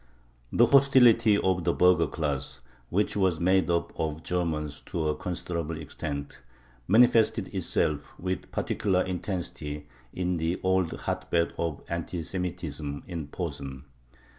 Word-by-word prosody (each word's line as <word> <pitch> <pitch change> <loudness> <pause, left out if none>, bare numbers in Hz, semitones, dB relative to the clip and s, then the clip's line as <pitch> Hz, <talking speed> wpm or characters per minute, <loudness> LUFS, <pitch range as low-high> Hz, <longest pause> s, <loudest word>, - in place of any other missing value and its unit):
The 120 - +5
hostility 120 -5 +6
of 95 -3 +1
the 85 - +2
burgher 90 -3 +4
class, 70 -5 -3 0.3
which 100 +5 +1
was 95 -5 +2
made 95 +1 +3
up 85 -1 0
of 80 0 -2
Germans 80 -5 -2
to 80 -2 -1
a 75 - 0
considerable 85 -2 -4
extent, 70 -2 -6 0.5
manifested 115 +1 +4
itself 75 -2 -1
with 95 +1 -3
particular 95 -3 0
intensity 85 -5 -4 0.2
in 90 -1 -1
the 80 +2 -1
old 95 -2 +2
hotbed 85 -1 0
of 85 -3 -2
anti 85 0 -3
Semitism, 80 -5 -4
in 85 -5 -5
Posen. 70 -4 -6
85 Hz, 125 wpm, -28 LUFS, 75-95 Hz, 0.5 s, hostility